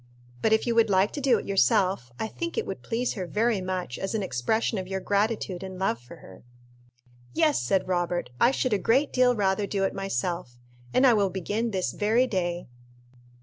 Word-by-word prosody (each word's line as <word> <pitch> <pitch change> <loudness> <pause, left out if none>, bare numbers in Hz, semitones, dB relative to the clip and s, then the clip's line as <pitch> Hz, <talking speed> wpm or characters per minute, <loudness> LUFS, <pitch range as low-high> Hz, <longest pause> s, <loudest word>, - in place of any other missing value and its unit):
But 220 - +2
if 220 - +3
you 240 - +1
would 230 -1 +4
like 195 +1 +3
to 290 - -5
do 260 -4 +4
it - - -6
yourself, 185 -6 +2
I - - -2
think 335 - -5
it 455 - 0
would - - -6
please 240 +2 -2
her 185 -4 -5
very 215 +1 +1
much 185 -7 -4
as 195 +3 -3
an 210 - -1
expression 210 - 0
of 185 - -6
your 190 0 -3
gratitude 200 -2 -1
and 190 -1 -7
love 185 -11 0
for 120 - -13
her." 95 - -15 0.9
"Yes," 315 -2 +3
said 185 +11 0
Robert, 175 -5 -1
"I 240 - +7
should 255 -2 0
a 205 - +2
great 260 +9 +2
deal 250 -1 +4
rather 200 -1 +1
do 195 -1 -1
it 195 - 0
myself, 175 -7 -3 0.3
and 260 - +4
I 250 - +7
will 200 -3 +2
begin 205 +5 -2
this 190 -4 -1
very 220 +4 +2
day." 175 -5 -2
195 Hz, 205 wpm, -26 LUFS, 185-230 Hz, 0.9 s, I